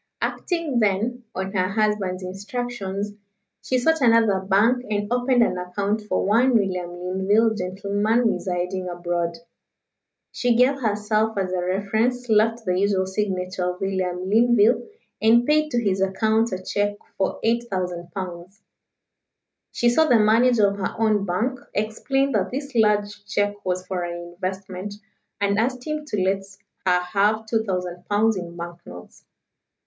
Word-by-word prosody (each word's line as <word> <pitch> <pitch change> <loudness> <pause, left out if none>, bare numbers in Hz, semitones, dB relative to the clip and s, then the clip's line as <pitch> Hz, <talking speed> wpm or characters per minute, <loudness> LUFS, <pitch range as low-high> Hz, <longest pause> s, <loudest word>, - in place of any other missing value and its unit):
Acting, 330 -8 -1
then, 225 +4 0
on 190 +1 -3
her 185 -2 +1
husband's 200 -3 0
instructions, 205 +1 -4 0.5
she 255 - 0
sought 320 +5 +2
another 230 -5 +4
bank 205 +6 +2
and 205 +2 -1
opened 245 0 +3
an 180 - 0
account 200 +4 -2
for 210 - -1
one 235 +5 +3
William 185 -5 0
Linville, 190 +5 +1
gentleman, 205 +4 0
residing 180 -2 -2
abroad. 175 -1 -2 0.9
She 245 -1 +1
gave 265 +3 +3
herself 215 0 0
as 190 -2 -1
a 185 -1 -1
reference, 220 +7 0
left 225 +1 +2
the 180 0 +1
usual 195 -1 +2
signature 185 -2 -2
of - - -19
William 185 -2 -2
Linville, 230 - +4 0.3
and 230 +2 +5
paid 305 +1 +2
to 240 -4 +1
his 195 -4 0
account 220 +4 +1
a 185 0 -4
cheque 205 +2 -1 0.2
for 190 - -1
8,000 185 -7 -1
pounds. 180 +1 -7 1.1
She 240 - +1
saw 315 +7 +4
the 245 -6 +5
manager 220 0 +4
of 200 0 -2
her 195 - -3
own 215 -3 +1
bank, 235 +9 -1 0.2
explained 270 +6 0
that 200 -3 +1
this 280 +2 -5
large 210 -2 +1
cheque 205 0 -1
was 185 0 -2
for 185 -1 -3
an 175 0 -6
investment, 190 +2 -5 0.4
and 200 0 +1
asked 250 +2 -1
him 305 -1 -3
to 210 -10 -1
let 195 +1 +1 0.5
her 180 -1 +4
have 205 +4 +1
2,000 185 -6 -2
pounds 215 +2 +3
in 175 -2 -6
bank 170 0 -7
notes. 90 0 -12
205 Hz, 145 wpm, -23 LUFS, 185-230 Hz, 1.1 s, and